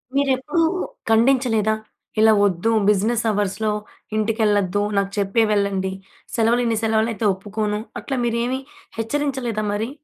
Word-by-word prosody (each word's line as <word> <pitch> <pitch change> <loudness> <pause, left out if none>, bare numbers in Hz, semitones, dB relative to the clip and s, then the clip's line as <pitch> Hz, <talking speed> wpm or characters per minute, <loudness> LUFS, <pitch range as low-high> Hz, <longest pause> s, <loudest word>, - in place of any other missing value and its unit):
మీరెప్పుడూ 280 +3 +1 0.5
ఖండించలేదా? 225 -2 +3 0.4
ఇలా 220 0 +6
వద్దు. 195 +3 +1 0.2
బిజినెస్ 215 +3 +2
అవర్స్‌లో 210 +1 -1 0.4
ఇంటికెళ్ళొద్దు. 210 -3 +1 0.2
నాకు 200 0 +1
చెప్పే 200 +3 +2
వెళ్ళండి. 200 -2 0 0.4
సెలవులు 230 +1 +3
ఇన్ని 230 -1 +1
సెలవులు 220 0 +2
అయితే 220 +1 -3
ఒప్పుకోను. 210 +2 -3 0.2
అట్లా 270 - -3
మీరేమీ 240 +2 0 0.4
హెచ్చరించలేదా 245 -2 -2
మరి? 220 +3 -2
220 Hz, 115 wpm, -22 LUFS, 205-235 Hz, 0.5 s, ఇలా